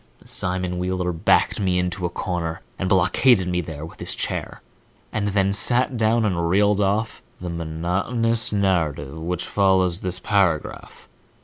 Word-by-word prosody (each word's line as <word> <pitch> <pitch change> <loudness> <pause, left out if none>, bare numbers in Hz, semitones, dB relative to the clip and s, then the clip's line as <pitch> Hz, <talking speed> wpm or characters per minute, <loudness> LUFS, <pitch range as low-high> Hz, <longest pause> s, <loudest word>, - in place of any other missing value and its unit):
Simon 90 -1 -2
Wheeler 90 0 -1
backed 85 +5 +2
me 95 -3 +1
into 90 0 -1
a - - -6
corner 85 -3 -4 0.2
and 95 - -1
blockaded 95 +2 +3
me 90 -1 0
there 80 -2 -7
with 80 - -13
his - - -1
chair, - - -3 0.5
and 105 -1 -1
then 100 -1 +1
sat 125 +5 +4
me 125 - -5
down 110 +1 +2
and 85 -4 0
reeled 100 +2 +3
off 105 +3 -1 0.2
the 90 -1 -5
monotonous 90 +8 -1
narrative 80 -9 0
which 85 +2 -2
follows 95 -3 +2
this 90 -2 -4
paragraph. 90 -4 -1
95 Hz, 150 wpm, -22 LUFS, 85-100 Hz, 0.5 s, sat